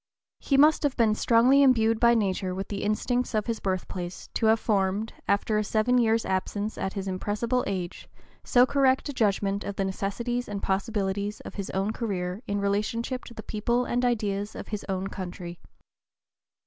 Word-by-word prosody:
He 275 Hz, -, +1 dB
must 300 Hz, +2 st, +6 dB
have 285 Hz, -3 st, 0 dB
been 225 Hz, -3 st, +4 dB
strongly 240 Hz, +5 st, +4 dB
imbued 225 Hz, -4 st, +4 dB
by 235 Hz, 0 st, +5 dB
nature 190 Hz, -3 st, 0 dB
with 195 Hz, +1 st, -5 dB
the 200 Hz, -1 st, -4 dB
instincts 245 Hz, +3 st, 0 dB
of 215 Hz, -, +1 dB
his 230 Hz, -2 st, -2 dB
birthplace 185 Hz, -1 st, -4 dB
to 225 Hz, -, +1 dB
have 220 Hz, +1 st, +4 dB
formed, 205 Hz, 0 st, 0 dB
after 210 Hz, +1 st, +1 dB
a -, -, 0 dB
seven 220 Hz, +4 st, +2 dB
years' 225 Hz, -1 st, +2 dB
absence 205 Hz, +3 st, -2 dB
at 190 Hz, -, -3 dB
his 195 Hz, -1 st, -4 dB
impressible 210 Hz, +6 st, -1 dB
age, 180 Hz, -3 st, -4 dB, 0.3 s
so 245 Hz, 0 st, +5 dB
correct 270 Hz, +1 st, +2 dB
a -, -, -3 dB
judgment 200 Hz, -3 st, 0 dB
of 200 Hz, -, -5 dB
the 195 Hz, -, -1 dB
necessities 235 Hz, +6 st, -2 dB
and 200 Hz, -1 st, -5 dB
possibilities 200 Hz, 0 st, -1 dB
of -, -, -9 dB
his 200 Hz, -2 st, -5 dB
own 195 Hz, +3 st, -1 dB
career 190 Hz, -4 st, -3 dB
in 205 Hz, 0 st, -1 dB
relationship 215 Hz, +5 st, -1 dB
to 235 Hz, -, -11 dB
the 220 Hz, -, -7 dB
people 235 Hz, +4 st, 0 dB
and 245 Hz, +1 st, -1 dB
ideas 210 Hz, -4 st, -1 dB
of -, -, -8 dB
his 210 Hz, -2 st, -4 dB
own 190 Hz, 0 st, -1 dB
country. 180 Hz, -3 st, -6 dB
210 Hz, 180 wpm, -27 LUFS, 195-235 Hz, 0.3 s, must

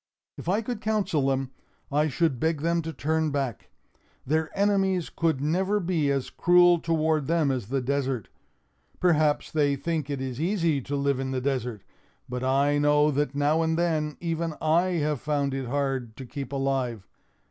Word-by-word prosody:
"If -, -, -6 dB
I 210 Hz, +5 st, +1 dB
could 235 Hz, -1 st, -4 dB
counsel 205 Hz, -11 st, 0 dB
them, 135 Hz, -1 st, -1 dB, 0.4 s
I 150 Hz, +2 st, +2 dB
should 155 Hz, -3 st, 0 dB
beg 160 Hz, -2 st, 0 dB
them 170 Hz, +1 st, +1 dB
to 160 Hz, 0 st, -5 dB
turn 160 Hz, 0 st, 0 dB
back. 135 Hz, -8 st, -3 dB, 0.6 s
Their 155 Hz, +3 st, 0 dB
enemies 195 Hz, -3 st, +1 dB
could 165 Hz, -5 st, +1 dB
never 190 Hz, +7 st, +1 dB
be 170 Hz, -6 st, 0 dB
as 135 Hz, -2 st, -1 dB
cruel 175 Hz, -1 st, +5 dB
toward 160 Hz, -3 st, 0 dB
them 160 Hz, -4 st, +2 dB
as 125 Hz, -6 st, -3 dB
the 135 Hz, +2 st, -1 dB
desert. 135 Hz, -3 st, -1 dB, 0.7 s
Perhaps 155 Hz, -4 st, +2 dB
they 145 Hz, -2 st, +2 dB
think 155 Hz, 0 st, -3 dB
it 140 Hz, -2 st, -2 dB
is 130 Hz, +1 st, -4 dB
easy 165 Hz, -5 st, +1 dB
to 140 Hz, +3 st, -4 dB
live 140 Hz, -1 st, 0 dB
in 135 Hz, 0 st, -2 dB
the 130 Hz, -1 st, -1 dB
desert! 125 Hz, -5 st, -2 dB, 0.4 s
But 125 Hz, +1 st, -4 dB
I 140 Hz, +2 st, +2 dB
know 150 Hz, +1 st, +4 dB
that, 145 Hz, -1 st, -1 dB
now 145 Hz, +3 st, +2 dB
and 160 Hz, 0 st, +1 dB
then, 155 Hz, -3 st, 0 dB
even 165 Hz, -1 st, -2 dB
I 170 Hz, +4 st, +2 dB
have 150 Hz, -4 st, -1 dB
found 145 Hz, -2 st, 0 dB
it 135 Hz, -2 st, -3 dB
hard 135 Hz, -4 st, -2 dB
to 130 Hz, -, -7 dB
keep 135 Hz, 0 st, -6 dB
alive. 135 Hz, -7 st, -1 dB
150 Hz, 175 wpm, -26 LUFS, 135-165 Hz, 0.7 s, cruel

